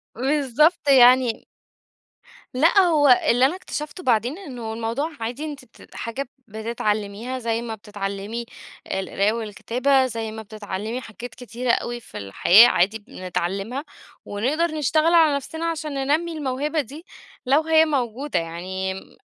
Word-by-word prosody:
بالضبط 290 Hz, +5 st, +2 dB
يعني 250 Hz, -2 st, +5 dB, 1.1 s
لأ. 325 Hz, +9 st, +4 dB
هو 315 Hz, -6 st, +4 dB, 0.2 s
اللي 250 Hz, +2 st, +5 dB
أنا 315 Hz, +7 st, +1 dB
اكتشفته 325 Hz, -1 st, -6 dB
بعدين، 245 Hz, -, +1 dB
إنه 245 Hz, -, -7 dB
الموضوع 230 Hz, +8 st, -2 dB
عادي 245 Hz, +7 st, -4 dB
أنت 285 Hz, -4 st, -7 dB
ت 230 Hz, -, -18 dB
حاجة 245 Hz, +3 st, -5 dB, 0.2 s
بتتعلّميها 220 Hz, +2 st, -3 dB
زي 230 Hz, -1 st, -1 dB
ما 225 Hz, -2 st, -5 dB
بتتعلّمي 205 Hz, +2 st, -5 dB, 0.5 s
القراية 200 Hz, +2 st, 0 dB
والكتابة، 245 Hz, +5 st, +1 dB
زي 225 Hz, -3 st, -4 dB
ما 220 Hz, 0 st, -7 dB
بتتعلّمي 215 Hz, +3 st, -5 dB
حاجات 230 Hz, +1 st, -9 dB
كتيرة 245 Hz, 0 st, -2 dB
أوي 240 Hz, 0 st, -1 dB
في -, -, -11 dB
الحياة 175 Hz, -, +6 dB
عادي 205 Hz, +2 st, +2 dB
بنتعلّمها، 195 Hz, -, -4 dB, 0.4 s
ونقدر 265 Hz, +11 st, 0 dB
نشتغل 310 Hz, +2 st, +2 dB
على 315 Hz, -4 st, +5 dB
نفسنا 320 Hz, +4 st, -4 dB
عشان 305 Hz, -2 st, -5 dB
ننمّي 295 Hz, +5 st, 0 dB
الموهبة 295 Hz, +1 st, -1 dB
دي 290 Hz, -, -11 dB, 0.4 s
لو 280 Hz, +5 st, +4 dB
هي 320 Hz, 0 st, +4 dB
موجودة. 270 Hz, -, -1 dB
يعني 185 Hz, +3 st, -4 dB
م 190 Hz, -, -12 dB
245 Hz, 135 wpm, -23 LUFS, 220-290 Hz, 1.1 s, الحياة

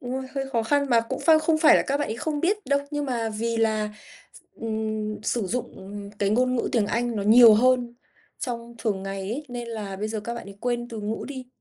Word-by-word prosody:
đúng, 245 Hz, 0 st, -5 dB
rồi 265 Hz, 0 st, -3 dB
hơi 270 Hz, 0 st, -3 dB
khó 230 Hz, -3 st, +1 dB
khăn. 285 Hz, +4 st, +1 dB
Mà 235 Hz, -, +5 dB
cũng 230 Hz, -, -5 dB
phai 320 Hz, -1 st, +6 dB
không 310 Hz, 0 st, +1 dB
phải 310 Hz, -, +7 dB
là -, -, +2 dB
các 275 Hz, -, +1 dB
bạn 290 Hz, -, -1 dB
ấy 220 Hz, -, -3 dB
không 295 Hz, +3 st, -2 dB
biết 405 Hz, +4 st, 0 dB
đâu, 280 Hz, +1 st, +2 dB
nhưng 290 Hz, -1 st, -2 dB
mà 235 Hz, -4 st, -1 dB
vì 230 Hz, +2 st, -2 dB
là 215 Hz, -1 st, +1 dB, 0.4 s
s -, -, -15 dB, 0.2 s
ừm, 215 Hz, -1 st, -3 dB
sử 225 Hz, -1 st, -1 dB
dụng 200 Hz, -2 st, -6 dB
cái 200 Hz, -1 st, +1 dB
ngôn 255 Hz, +3 st, +2 dB
ngữ -, -, -1 dB
tiếng 225 Hz, -4 st, +2 dB
Anh 235 Hz, +1 st, -1 dB
nó 205 Hz, -, -1 dB
nhiều 225 Hz, +1 st, +8 dB
hơn 245 Hz, +1 st, +3 dB, 0.4 s
trong 235 Hz, -1 st, -5 dB
thường 200 Hz, -5 st, -1 dB
ngày 195 Hz, 0 st, -4 dB
ấy, 230 Hz, +10 st, -4 dB
nên 240 Hz, -1 st, -6 dB
là 210 Hz, -4 st, -5 dB
bây 210 Hz, +2 st, -3 dB
giờ 220 Hz, -1 st, -3 dB
các 235 Hz, +3 st, -5 dB
bạn 235 Hz, -4 st, -8 dB
ấy 195 Hz, -, -11 dB
quên 240 Hz, -1 st, -2 dB
từ 225 Hz, -2 st, -6 dB
ngữ 210 Hz, +2 st, -3 dB
đi. 260 Hz, -3 st, -7 dB
235 Hz, 250 wpm, -25 LUFS, 215-255 Hz, 0.4 s, nhiều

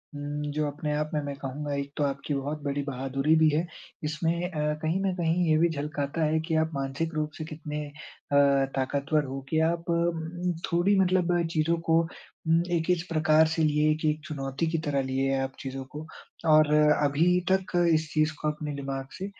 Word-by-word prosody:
उम, 145 Hz, +1 st, -4 dB
जो 150 Hz, +1 st, -1 dB
अपने 150 Hz, +1 st, -3 dB
आप 150 Hz, 0 st, -1 dB
में 150 Hz, -, +1 dB
मैं 140 Hz, -1 st, -4 dB
कहूँगा 140 Hz, +2 st, -4 dB
एक 140 Hz, 0 st, -3 dB
तो 150 Hz, -, +1 dB
आपकी 140 Hz, +1 st, -2 dB
बहुत 145 Hz, +2 st, -3 dB
बड़ी 145 Hz, 0 st, -1 dB
बहादुरी 135 Hz, +3 st, 0 dB
भी 155 Hz, -1 st, +5 dB
है। 155 Hz, +3 st, +1 dB, 0.4 s
इसमें 165 Hz, +3 st, -1 dB
अ, 150 Hz, -2 st, 0 dB
कहीं 165 Hz, +4 st, 0 dB
न 195 Hz, -1 st, +1 dB
कहीं 175 Hz, 0 st, +1 dB
ये 155 Hz, -, +4 dB
भी 170 Hz, +2 st, +4 dB
झलकाता 150 Hz, 0 st, -2 dB
है 155 Hz, +1 st, +2 dB
कि 160 Hz, -, 0 dB
आप 160 Hz, +1 st, +1 dB
मानसिक 140 Hz, +4 st, -2 dB
रूप 155 Hz, 0 st, -1 dB
से 155 Hz, -, -4 dB
कितने 150 Hz, -1 st, -5 dB
अ, -, -, -12 dB, 0.8 s
ताकतवर 140 Hz, +3 st, 0 dB
हो 135 Hz, +1 st, -5 dB
कि 160 Hz, -, +2 dB
आप 170 Hz, 0 st, -3 dB
अ, -, -, +3 dB
म 170 Hz, +1 st, -1 dB, 0.2 s
थोड़ी 180 Hz, +4 st, +3 dB
मतलब 180 Hz, -2 st, +2 dB
चीज़ों 165 Hz, +1 st, +1 dB
को 165 Hz, +1 st, +5 dB
अम 165 Hz, 0 st, -2 dB
एक 165 Hz, 0 st, 0 dB
इस 175 Hz, -2 st, +2 dB
प्रकार 155 Hz, 0 st, +4 dB
से 160 Hz, 0 st, 0 dB
लिए 150 Hz, 0 st, +3 dB
एक 155 Hz, 0 st, 0 dB
चुनौती 140 Hz, 0 st, -2 dB
की 165 Hz, +1 st, 0 dB
तरह 140 Hz, -2 st, +1 dB
लिए 135 Hz, +1 st, 0 dB
आप 135 Hz, 0 st, -2 dB
चीजों 135 Hz, 0 st, -5 dB
को। 155 Hz, -, -6 dB, 0.4 s
और 155 Hz, -1 st, +6 dB
अभी 150 Hz, +3 st, +4 dB
तक 190 Hz, 0 st, +1 dB, 0.2 s
इस 155 Hz, -1 st, +1 dB
चीज़ 155 Hz, 0 st, +2 dB
को 155 Hz, -, -1 dB
अपने 150 Hz, -1 st, -5 dB
दिमाग 135 Hz, -1 st, -4 dB
से 190 Hz, -, -4 dB
155 Hz, 200 wpm, -27 LUFS, 145-165 Hz, 0.8 s, और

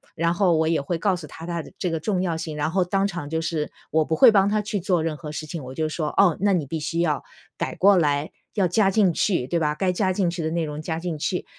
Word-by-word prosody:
然 170 Hz, 0 st, +1 dB
后 180 Hz, -2 st, +3 dB
我 160 Hz, 0 st, +2 dB
也 165 Hz, -2 st, +1 dB
会 165 Hz, +5 st, -2 dB
告 190 Hz, +3 st, +1 dB
诉 170 Hz, -3 st, -8 dB
他 160 Hz, -, -10 dB
它 170 Hz, -1 st, -3 dB
的 -, -, -13 dB
这 180 Hz, -, -1 dB
个 165 Hz, -1 st, -2 dB
重 185 Hz, +2 st, -1 dB
要 175 Hz, -3 st, -1 dB
性， 160 Hz, -2 st, -5 dB
然 150 Hz, +1 st, 0 dB
后 185 Hz, +1 st, +2 dB
当 195 Hz, +2 st, +1 dB
场 170 Hz, -6 st, -5 dB
就 160 Hz, +1 st, -1 dB
是 165 Hz, -2 st, -2 dB, 0.2 s
我 160 Hz, +1 st, +3 dB
不 160 Hz, -, -1 dB
会 245 Hz, +7 st, +8 dB
帮 200 Hz, -2 st, +4 dB
他 210 Hz, 0 st, +1 dB
去 210 Hz, 0 st, -3 dB
做 180 Hz, -3 st, +1 dB
任 160 Hz, -1 st, -2 dB
何 150 Hz, 0 st, -8 dB
事 155 Hz, +1 st, -5 dB
情， 155 Hz, -1 st, -6 dB
我 130 Hz, +1 st, -8 dB
就 155 Hz, +1 st, 0 dB
说： 155 Hz, 0 st, -3 dB
“哦， 185 Hz, -5 st, +5 dB
那 200 Hz, 0 st, +3 dB
你 170 Hz, -5 st, 0 dB
必 160 Hz, +4 st, -4 dB
须 165 Hz, +2 st, -3 dB
要 150 Hz, -6 st, 0 dB, 0.3 s
改 -, -, -3 dB
过 200 Hz, +1 st, +5 dB
来， 145 Hz, -2 st, +1 dB, 0.2 s
要 195 Hz, -4 st, +3 dB
加 195 Hz, +3 st, +3 dB
进 195 Hz, -3 st, +3 dB
去， 170 Hz, -8 st, 0 dB
对 170 Hz, +4 st, 0 dB
吧。 150 Hz, -2 st, 0 dB
该 185 Hz, +4 st, +1 dB
加 190 Hz, 0 st, +1 dB
进 185 Hz, -1 st, +1 dB
去 170 Hz, -1 st, -4 dB
的 160 Hz, -, -1 dB
内 170 Hz, 0 st, 0 dB
容 150 Hz, 0 st, -5 dB
加 160 Hz, +1 st, -3 dB
进 170 Hz, -2 st, -4 dB
去。” 180 Hz, +4 st, -2 dB
170 Hz, 310 characters per minute, -24 LUFS, 155-185 Hz, 0.3 s, 会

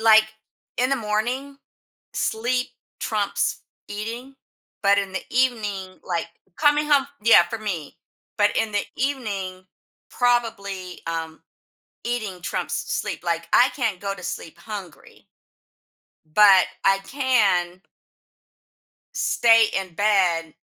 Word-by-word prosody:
Like 220 Hz, -1 st, +7 dB, 0.5 s
in 255 Hz, +2 st, +1 dB
the 275 Hz, -, +2 dB
morning, 245 Hz, +6 st, -2 dB, 0.6 s
sleep 250 Hz, +3 st, -1 dB, 0.3 s
trumps 210 Hz, -2 st, -1 dB, 0.3 s
eating, 230 Hz, +6 st, -6 dB, 0.5 s
but 200 Hz, 0 st, +5 dB
in 195 Hz, -1 st, -2 dB
the 190 Hz, -, -3 dB
evening, 210 Hz, -7 st, -1 dB
like, 170 Hz, -2 st, -2 dB, 0.3 s
coming 295 Hz, 0 st, +3 dB
home 280 Hz, -2 st, +4 dB, 0.2 s
yeah, 230 Hz, -5 st, +8 dB
for 225 Hz, -, -4 dB
me. 185 Hz, -9 st, -5 dB, 0.4 s
But 205 Hz, 0 st, +3 dB
in 220 Hz, -1 st, 0 dB
the 205 Hz, -, 0 dB
evening 200 Hz, -9 st, -3 dB, 0.5 s
probably, 200 Hz, -7 st, -1 dB
um, 165 Hz, -1 st, -4 dB, 0.6 s
eating 220 Hz, -6 st, -3 dB
trumps -, -, -3 dB
s -, -, -2 dB
sleep. -, -, -5 dB
Like, 170 Hz, -1 st, -2 dB
I 245 Hz, -, +6 dB
can't 225 Hz, -9 st, -1 dB
go 200 Hz, -1 st, -3 dB
to 180 Hz, -, -12 dB
sleep 165 Hz, -, -6 dB
hungry 200 Hz, -6 st, -9 dB, 1.1 s
but 195 Hz, -3 st, +7 dB, 0.2 s
I 195 Hz, 0 st, +4 dB
can 195 Hz, -9 st, +1 dB, 1.3 s
stay 225 Hz, -1 st, +4 dB
in 185 Hz, -3 st, -7 dB
bed, 180 Hz, -6 st, +2 dB
210 Hz, 115 wpm, -23 LUFS, 185-240 Hz, 1.3 s, yeah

